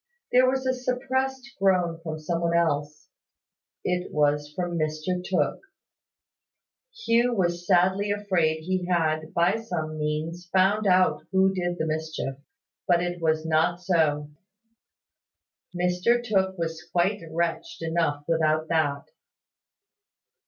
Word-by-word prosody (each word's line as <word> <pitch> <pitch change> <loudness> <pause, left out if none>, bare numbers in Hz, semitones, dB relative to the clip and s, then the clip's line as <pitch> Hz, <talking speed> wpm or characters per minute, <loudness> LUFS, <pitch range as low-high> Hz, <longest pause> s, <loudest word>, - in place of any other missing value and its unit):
There 255 +1 +5
was 265 0 -1
a 260 - +2
suppressed 255 0 -2
groan 180 -4 +2
from 160 -2 -5
some 165 +2 -2
one 170 0 +2
else. 150 -2 -1 0.8
It 180 0 -2
was 145 0 +1
from 175 +1 -3
Mr 155 +3 -2
Tooke. 185 0 0 1.5
Hugh 235 +1 +3
was 175 -3 -1
sadly 190 +3 +3
afraid 180 -6 0
he 185 +1 -1
had, 155 -3 0
by 175 +5 +3
some 160 -8 -4
means, 160 +4 -3
found 200 +3 +3
out 180 -5 +3
who 190 0 +3
did 175 -1 -2
the 160 - -1
mischief. 155 -3 -3 0.5
But 175 -1 +3
it 175 -1 -4
was 160 -1 +1
not 165 +2 +2
so. 155 -5 +1 1.4
Mr 180 +7 +1
Tooke 190 -4 0
was 165 -1 -4
quite 190 +4 +1
wretched 165 0 -2
enough 160 -3 0
without 155 -1 +1
that. 145 -4 +1
175 Hz, 125 wpm, -26 LUFS, 155-190 Hz, 1.5 s, There